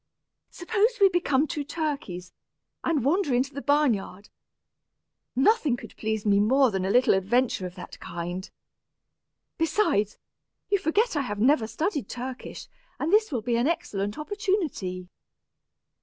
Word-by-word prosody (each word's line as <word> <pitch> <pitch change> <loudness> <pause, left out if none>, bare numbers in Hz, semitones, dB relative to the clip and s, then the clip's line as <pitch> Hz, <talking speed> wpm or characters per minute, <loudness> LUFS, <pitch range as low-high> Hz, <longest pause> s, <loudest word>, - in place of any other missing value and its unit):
Suppose 440 +6 0
we 395 -1 +7
become 310 -6 +2
two 300 -2 -3
turkeys, 280 - -4 0.5
and 300 -7 0
wander 295 -3 +2
into 260 +3 0
the 280 - -5
barn 290 -3 +3
yard. 200 0 -7 1.1
Nothing 280 - +3
could - - -11
please 220 -1 -2
me 200 -1 +4
more 255 +4 +4
than 190 -2 -1
a - - 0
little 250 +5 +4
adventure 195 +1 +1
of 180 - -12
that 180 - -10
kind. 175 +2 -5 1.1
Besides, 325 - +1 0.5
you 400 0 +3
forget 400 +7 +1
I 290 - +2
have 205 -6 -4
never 245 0 +3
studied 290 - -2
Turkish, 255 +1 -7 0.3
and 330 - -1
this 430 -2 +4
will 240 -6 -2
be 235 0 +1
an 240 +4 +2
excellent 205 -11 -2
opportunity." 310 - -2
265 Hz, 140 wpm, -26 LUFS, 205-330 Hz, 1.1 s, we